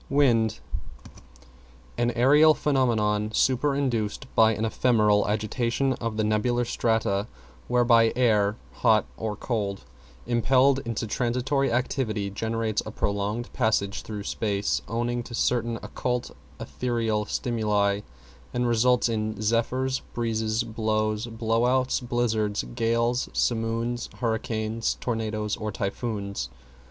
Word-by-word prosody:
=WIND= 115 -6 +3 1.4
An 120 0 +1
aerial 150 +6 +6
phenomenon, 110 -7 +1
superinduced 130 -4 +1
by 110 0 +5
an 110 - -1
ephemeral 110 -3 +3
agitation 115 +5 0
of 115 -3 -4
the 110 - +1
nebular 120 +3 +1
strata, 110 -3 0 0.4
whereby 120 -2 +4
air, 105 -4 +3 0.2
(hot 110 -3 +4
or 110 -1 -3
cold), 100 -4 -3 0.4
impelled 130 +3 +3
into 115 -1 -2
transitory 125 +4 0
activity, 115 -5 -1
generates 110 +1 -1
a - - -7
prolonged 105 +3 -2
passage 100 -2 0
through 105 -2 -6
space, 100 -1 -1
owing 120 +1 -1
to 120 0 -7
certain 115 -1 0
occult 125 -1 -3 0.3
ethereal 115 -4 -1
stimuli, 105 -4 0 0.6
and 125 0 +1
results 120 +1 +3
in 110 -2 -2
zephyrs, 125 +4 0 0.2
breezes, 110 -1 0
blows, 110 -1 -1
blow 115 +1 0
outs, 130 0 +2
blizzards, 115 -4 -1
gales, 115 +1 +1
simoons, 115 +1 -1
hurricanes, 110 -1 -1
tornadoes 110 -3 -2
or 110 0 -3
typhoons. 100 - -3
115 Hz, 110 wpm, -26 LUFS, 110-120 Hz, 1.4 s, aerial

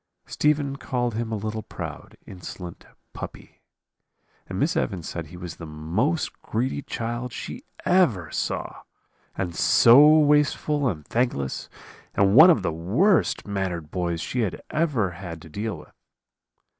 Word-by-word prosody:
"Stephen 145 -2 0
called 120 -4 -2
him 115 +1 -3
a - - 0
little 110 +1 -4
proud, - - -8
insolent 90 -1 -9 0.3
puppy. - - -9 0.9
And 95 - -5
Miss 165 - +1
Evans 95 - -2
said 85 -2 -5
he 90 - -11
was 90 -3 -7
the 85 - -8
most 85 - -2
greedy 130 +5 -2
child 120 0 -4
she - - -7 0.2
ever 115 - +2
saw, - - -3 0.6
and 90 -3 -2
so 125 - +7
wasteful 150 -1 +2
and 75 -6 -5
thankless, 115 - -1 0.5
and 100 0 +3
one 155 +10 +10
of 120 - +4
the 85 - -1
worst 125 - +2
mannered 95 -6 -3
boys 85 -2 -2
she 125 +6 -1 0.3
ever 145 - +1
had 85 -2 -8
to 80 - -12
deal 105 +5 -4
with. - - -15
110 Hz, 140 wpm, -25 LUFS, 90-140 Hz, 0.9 s, one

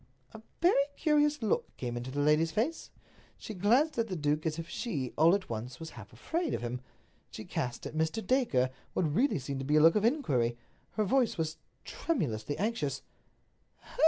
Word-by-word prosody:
A 220 - -10 0.2
very 310 -6 +5
curious 295 -3 +2
look 215 - -1
came 120 -2 -3
into 120 +2 -4
the 145 +2 -2
lady's 150 +3 +4
face. 245 - -1 0.5
She 220 - -7
glanced 240 - +3
at 230 - +1
the 190 - -3
duke 150 0 0
as 155 0 -2
if 165 0 -5
she, 170 - -3
all 165 +4 +6
at 200 - -4
once, 120 +2 -5
was 160 0 -7
half 110 -5 -11
afraid 320 - -2
of - - -4
him. 120 +1 -3 0.5
She 110 - -8
cast 125 -7 -3
at - - -5
Mr. 160 +8 -1
Dacre 185 - +2 0.2
what - - +1
really 200 - +2
seemed 135 0 -4
to - - -3
be 145 +3 +1
a - - +7
look 165 +2 +7
of 210 - +2
inquiry. 135 - +1 0.4
Her 215 - +1
voice 245 +3 +2
was 160 -1 -2 0.3
tremulously 145 - -2
anxious. 180 - -1
160 Hz, 190 wpm, -31 LUFS, -, 0.5 s, a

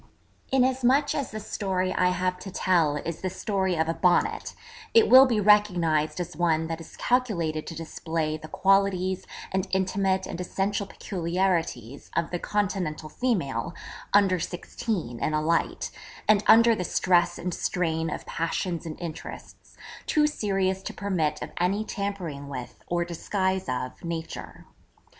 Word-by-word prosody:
_' - - -27 0.5
Inasmuch 260 +2 +3
as 280 - -2
the 215 - -6
story 190 -3 -1
I 180 - +3
have 180 0 -1
to 195 - -7
tell 170 -5 +2
is 165 +2 -5
the 185 - -1
story 190 -1 -1
of 160 0 +1
a 165 - +1
Bonnet, 180 +1 +1 0.4
it 450 -1 +7
will 265 +1 +10
be 230 -4 +1
recognised 180 -7 +3
as 175 0 -4
one 165 -2 +2
that 165 0 -4
is 165 - -13
calculated 175 -12 0
to 165 - -6
display 160 -1 -3
the 155 0 -8
qualities 190 0 +2 0.2
and 190 +1 -1
intimate 190 0 +1
and 175 - -5
essential 195 +2 -1
peculiarities 170 - -2
of 170 -1 0
the 175 - -2
'Continental 185 -7 -2
female' 170 - -1 0.4
(under 195 -3 +4
sixteen) 170 - -4
in 155 - 0
a 155 - +1
light, 165 +2 0 0.4
and 215 -1 +5
under 230 +1 +7
the 185 - -2
stress 175 0 +2
and 180 0 -3
strain 165 -3 -1
of - - -5
passions 170 +1 -2
and 155 - -7
interests, 170 -3 -9 0.3
too 300 -1 +3
serious 195 -8 0
to - - -7
permit 170 -7 -1
of - - -7
any 195 +5 +1
tampering 185 -10 -4
with, 125 -3 -7
or 175 0 0
disguise 190 +1 -1
of, 125 0 -4
nature. 165 -1 -6
180 Hz, 150 wpm, -26 LUFS, 165-200 Hz, 0.5 s, will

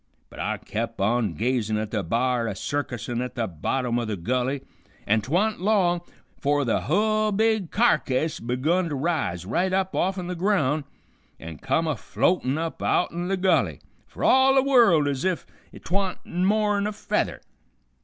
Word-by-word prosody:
But - - -12
I - - -1
kep' - - -5
on 105 -2 +1
gazin' 115 - 0
at 110 0 -3
the 110 - 0
b'ar 120 +5 0
a 105 - -3
circusin' 120 0 -3
at 125 0 -5
the 115 - -1
bottom 120 +7 -1
o' 120 - -2
the 110 -2 -3
gulley, 125 +9 -1 0.4
an 110 +1 +2
't 115 - -10
wa'n't 200 +4 +1
long 185 -4 +2 0.4
'fore 145 0 +1
the 115 - +1
hull 215 - +1
big 220 -3 +1
carcase 160 - +1
begun 155 +9 0
to 145 - -3
raise 135 - -1
right 180 - 0
up 190 0 0
offen 185 0 0
the 180 - -3
ground 165 -6 +1 0.5
an' 80 -1 -9
come 135 +5 0
a 155 -2 0
floatin' 130 - 0
up 165 0 -4
outen 175 0 0
the 195 +1 0
gulley, 185 0 +2 0.3
fer - - -8
all 265 +1 +5
the 265 - +5
world 235 - +5
ez 140 -2 -2
if 185 -2 -1 0.3
't - - -12
wa'n't 195 -2 -1
more'n 205 +3 +1
a 210 - -3
feather. - - -2
155 Hz, 175 wpm, -25 LUFS, 120-190 Hz, 0.5 s, all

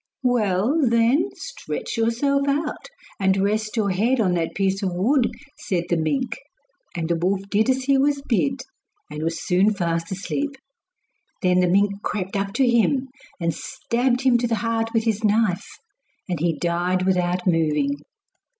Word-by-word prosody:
'Well, 235 - +2
then, 235 +3 +3
stretch - - -6
yourself 275 +5 +1
out, 295 +2 -1 0.3
and 190 0 +2
rest 215 +3 0
your 205 -3 +1
head 230 +8 +1
on 190 -5 +2
that 165 -2 -2
piece 195 0 0
of 185 -3 -2
wood,' 240 +7 +2 0.3
said 175 -3 -1
the - - +4
mink. 230 - -1 0.6
And 165 -2 -2
the 170 - +1
wolf 185 +4 0
did 215 +4 +2
as 260 0 +1
he 275 0 +3
was 280 0 +1
bid, 265 +3 0 0.5
and 150 - -5
was 165 +1 -3
soon 190 +4 +3
fast 165 -2 -2
asleep. 275 +9 -3 0.9
Then 180 0 +3
the 180 - +3
mink 200 +2 +2
crept 195 -3 -3
up 195 0 -1
to 260 +2 +2
him 255 +3 +2 0.3
and 170 -2 0
stabbed 245 - -1
him 255 -3 +4
to 240 - 0
the 230 - 0
heart 225 0 0
with 225 -1 +1
his 220 -1 -1
knife, 210 -3 +2 0.6
and 175 -4 -2
he 165 0 0
died 180 +2 0
without 180 -1 +1
moving. 155 -5 +2
205 Hz, 165 wpm, -23 LUFS, 180-245 Hz, 0.9 s, the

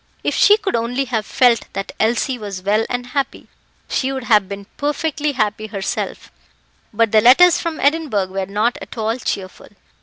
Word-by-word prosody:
If - - 0
she 415 - +5
could 420 -3 -2
only 245 +4 -1
have 225 -4 -3
felt 240 -4 +2
that 195 0 -4
Elsie 240 +3 0
was 200 -3 -7
well 210 +3 +1
and 245 0 -3
happy, 275 +2 -3 0.4
she 265 0 -1
would 265 -2 -4
have 210 -5 +3
been 200 0 -7
perfectly 295 0 -2
happy 215 -3 -1
herself, 200 -2 -4 0.6
but 225 0 +1
the 215 - +5
letters 300 +10 +6
from 335 -2 -4
Edinburgh 285 -9 +1
were 190 0 -3
not 210 +4 0
at - - -10
all 225 +1 -1
cheerful. 190 -5 -5
230 Hz, 175 wpm, -19 LUFS, 210-275 Hz, 0.6 s, letters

